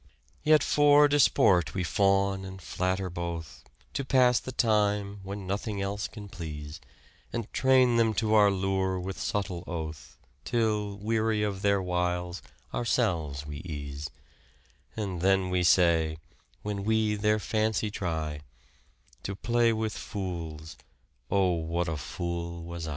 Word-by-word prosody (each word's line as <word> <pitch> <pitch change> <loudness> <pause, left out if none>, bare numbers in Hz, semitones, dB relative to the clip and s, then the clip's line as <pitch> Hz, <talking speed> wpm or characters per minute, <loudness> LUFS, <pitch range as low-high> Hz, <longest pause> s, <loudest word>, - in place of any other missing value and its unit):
" - - -34
Yet 155 - +6
for 145 0 +5
disport 100 - +4
we 95 - 0
fawn 95 +1 +2
and 95 0 -8
flatter 95 +1 -2
both, 85 -2 -6 0.3
To 140 - -2
pass 125 -2 +4
the 130 - -7
time 105 -4 +1
when 100 +1 -6
nothing 100 +2 -3
else 100 +1 -2
can 105 -3 -10
please, 75 -5 -7 0.5
And 115 -3 -5
train 130 -2 +4
them 115 -2 +3
to 110 +1 +1
our 105 -2 +6
lure 95 -1 0
with 95 +1 -5
subtle 100 -6 -2
oath, 80 -3 -6 0.3
Till, 105 -4 0
weary 110 0 0
of 100 -2 -2
their 100 -1 +2
wiles, 90 0 -1 0.3
ourselves 85 - 0
we 75 0 -6
ease; 75 -2 -6 0.9
And 95 -5 -3
then 95 0 +2
we 90 0 +2
say, 85 -3 +3 0.5
when 105 -1 -3
we 110 0 +2
their 105 +1 +2
fancy 110 0 0
try, 80 -6 -3 0.8
To 100 - -4
play 120 +2 +2
with 110 -1 -1
fools. 80 -5 -6 0.5
Oh 95 -2 +3
what 85 +1 -1
a 80 - -1
fool 85 +3 -4
was 85 -1 -6
I." - - -4
95 Hz, 140 wpm, -28 LUFS, 85-110 Hz, 0.9 s, Yet